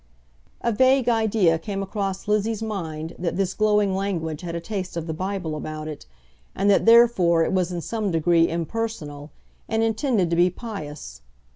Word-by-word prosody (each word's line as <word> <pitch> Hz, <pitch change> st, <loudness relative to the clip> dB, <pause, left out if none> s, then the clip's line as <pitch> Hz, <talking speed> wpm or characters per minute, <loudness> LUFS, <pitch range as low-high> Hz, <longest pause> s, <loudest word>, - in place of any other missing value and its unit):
A 235 Hz, -, +1 dB
vague 260 Hz, +3 st, +3 dB
idea 220 Hz, -8 st, +3 dB
came 195 Hz, +2 st, -4 dB
across 195 Hz, -1 st, -4 dB
Lizzie's 215 Hz, +1 st, 0 dB
mind 165 Hz, -7 st, -4 dB
that 175 Hz, 0 st, -2 dB
this 195 Hz, -1 st, 0 dB
glowing 210 Hz, -2 st, +2 dB
language 165 Hz, -6 st, -2 dB
had 170 Hz, -2 st, -5 dB
a -, -, -2 dB
taste 185 Hz, -1 st, -5 dB
of 165 Hz, -, -3 dB
the 160 Hz, -, -3 dB
Bible 185 Hz, -2 st, -3 dB
about 155 Hz, 0 st, -6 dB
it, 155 Hz, -2 st, -8 dB, 0.5 s
and 200 Hz, +1 st, +3 dB
that, 200 Hz, -, +3 dB
therefore, 225 Hz, -8 st, +6 dB
it -, -, -1 dB
was 185 Hz, -1 st, +1 dB
in 175 Hz, -1 st, -3 dB
some 215 Hz, +2 st, -2 dB
degree 165 Hz, 0 st, +3 dB
impersonal, 165 Hz, -5 st, -4 dB, 0.4 s
and 225 Hz, 0 st, +1 dB
intended 225 Hz, -, +1 dB
to -, -, +2 dB
be 175 Hz, +2 st, +4 dB
pious. 150 Hz, -, -8 dB
190 Hz, 170 wpm, -24 LUFS, 165-215 Hz, 0.5 s, therefore